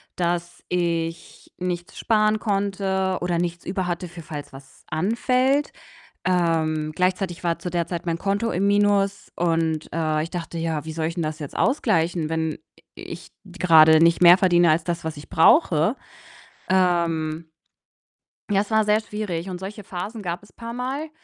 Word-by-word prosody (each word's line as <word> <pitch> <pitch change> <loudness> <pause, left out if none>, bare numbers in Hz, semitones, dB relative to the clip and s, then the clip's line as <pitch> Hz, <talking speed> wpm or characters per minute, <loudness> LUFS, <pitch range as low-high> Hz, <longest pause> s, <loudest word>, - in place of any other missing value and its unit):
dass 175 0 -2
ich 170 -2 -3
nichts 175 -1 -4
sparen 215 -1 +2
konnte 195 -2 -1
oder 175 -1 0
nichts 170 0 -3
über 185 0 -2
hatte 175 0 -3
für 175 0 -10
falls 155 -3 -8
was 135 0 -15
anfällt. 250 - +1 0.5
Ähm, 160 -4 +1
gleichzeitig 180 0 -1
war 170 -1 0
zu 180 - -4
der 170 -1 -1
Zeit 170 -1 -5
mein 165 -1 -1
Konto 200 +5 -1
im 190 +3 +1
Minus 200 -1 +1
und, 165 -2 0
äh, 155 -2 0
ich 165 - -6
dachte: 170 -1 -5
„Ja, 160 -3 -2
wie 160 - -5
soll 160 0 -2
ich 165 - -4
denn 170 - -2
das 155 0 -4
jetzt 145 -3 -7
ausgleichen, 175 - +1
wenn 160 -1 -1
i - - -15 0.4
ich 170 0 -9 0.3
grade 160 -2 +7
nicht 170 +1 +4
mehr 175 0 +9
verdiene 175 -3 +4
als 160 +1 +1
das, 170 -1 -3
was 160 -1 -3
ich 145 - -11
brauche?“ 165 - +4 0.7
Ähm 170 -4 +1 1.0
ja, 200 -1 +3
es 205 - -7
war 220 0 +3
sehr 210 +1 +3
schwierig 200 -5 -4
und 180 -1 -5
solche 200 +3 -7
Phasen 200 +5 -6
gab 175 -2 -4
es 205 -2 -20
paarmal 250 +6 -5
175 Hz, 165 wpm, -23 LUFS, 165-200 Hz, 1.0 s, mehr